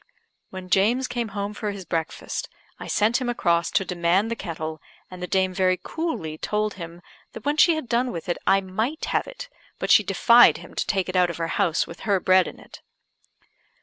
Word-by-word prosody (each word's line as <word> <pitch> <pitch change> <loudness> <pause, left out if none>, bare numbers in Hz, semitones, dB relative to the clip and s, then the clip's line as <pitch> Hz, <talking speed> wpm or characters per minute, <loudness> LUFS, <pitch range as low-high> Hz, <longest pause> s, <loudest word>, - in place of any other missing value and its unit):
When 185 -1 -9
James 235 +7 +3
came 240 -2 -3
home 200 0 -4
for 210 0 -4
his 200 -2 -7
breakfast, 165 -1 -4 0.3
I - - -7
sent 225 +5 +1
him 250 - -2
across 170 -7 +1
to 195 - 0
demand 180 +5 +1
the - - -1
kettle, 160 -6 -6 0.3
and 180 -1 -9
the 180 - -3
dame 190 0 +1
very 185 0 +2
coolly 170 - -4
told 210 0 -1
him 170 -1 -9 0.3
that 225 - -10
when 290 +1 +1
she 335 +1 +5
had 315 -5 -5
done 245 +1 0
with 165 - -7
it 175 - -2
I 195 0 +4
might 220 - -3
have - - -1
it, - - -8 0.3
but - - -1
she - - +8
defied 240 0 +5
him - - -13
to - - -2
take 190 -3 0
it 185 - -5
out 180 -1 +4
of 170 - -5
her 165 -1 -2
house 175 -5 +1
with 170 - -11
her 200 -3 +1
bread 185 0 +4
in - - -9
it. - - -14
195 Hz, 215 wpm, -24 LUFS, 175-230 Hz, 0.3 s, she